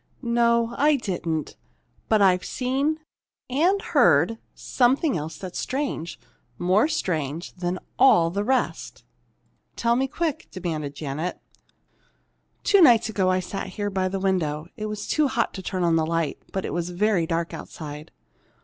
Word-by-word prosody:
"No, 235 -1 +2
I 295 +1 +5
didn't. 175 - -3 0.5
But 215 -2 +4
I've 185 -1 +4
seen 275 +5 -1 0.5
and 345 +9 +3
heard 175 - +3 0.2
something 265 +4 +2
else 155 +1 -4
that's 185 -2 -6
strange, 260 - -3 0.4
more 185 +9 +3
strange 160 - -2
than 180 0 -3 0.2
all 175 -11 +6
the 200 +3 -1
rest!" 255 +3 -1 0.7
"Tell 235 0 +2
me, 265 +2 +1
quick!" 315 +2 -3
demanded 155 -6 -4
Janet. 155 +4 -4 1.2
"Two 400 -2 +5
nights 240 -8 +6
ago, 195 -4 +1
I 185 0 +2
sat 195 +2 -5
here 205 +2 -4
by 190 -1 0
the 195 +1 -3
window. 165 -6 0
It 215 -2 -4
was 210 -1 -5
too 305 -2 +2
hot 245 -3 -1
to 190 - -6
turn 185 -1 -2
on 165 -1 +3
the 160 - +1
light, 165 -3 -1
but 190 - -3
it - - -4
was 175 0 -2
very 180 -2 +1
dark 165 0 -2
outside. 150 0 -8
190 Hz, 150 wpm, -24 LUFS, 170-245 Hz, 1.2 s, all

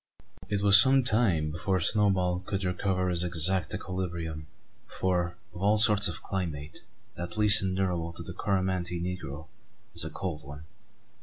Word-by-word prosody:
It 100 -1 -1
was 100 0 +11
some 135 0 +3
time 105 -11 +1
before 90 +4 -2
Snowball 90 0 +1
could 95 +1 -5
recover 90 0 -2
his 90 -1 -1
exact 90 +2 -1
equilibrium; 85 -4 -6 0.4
for, 90 -2 -2 0.2
of 90 - -10
all 105 +2 +2
sorts 105 -2 +6
of 85 -2 -6
climate, 80 -6 -5 0.4
that 90 +4 -7
least 105 0 +5
endurable 90 -3 -2
to 85 - -9
the 90 - -9
Coromantee 95 -3 -2
negro 80 -4 -6 0.5
is - - +3
a 80 - -5
cold 80 -2 -6
one. 70 +2 -11
90 Hz, 150 wpm, -27 LUFS, 85-100 Hz, 0.5 s, was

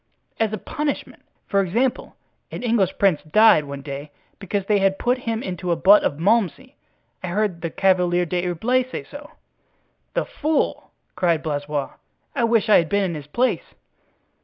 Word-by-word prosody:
"As 220 -2 +1
a 215 - -3
punishment. 290 +8 -4 0.2
For 200 - +1
example, 235 +8 -1 0.3
an - - -7
English 215 -6 +1
prince 195 -6 +3
died 160 -1 +5
one 140 -1 -7
day 140 +1 -7 0.3
because 195 0 -3
they 205 0 +2
had 195 0 +2
put 250 +1 0
him 225 +1 -2
into 180 -1 -4
a - - +3
butt 200 +4 +6
of 145 - -1
Malmsey. 225 - 0 0.5
I 185 - -5
heard 185 -2 -1
the 165 - -2
Chevalier 180 -2 +3
d'Herblay 180 +9 0
say - - -5
so." 290 +1 -11 0.9
"The - - 0
fool!" 310 +1 -1 0.3
cried 170 -3 +1
Blaisois, 145 -2 -2 0.5
"I 240 -4 +2
wish 230 -2 +2
I 215 - +7
had 165 -2 +1
been 200 0 +1
in 180 -3 -1
his 150 -2 -7
place." 250 +11 -1
195 Hz, 165 wpm, -22 LUFS, 170-225 Hz, 0.9 s, I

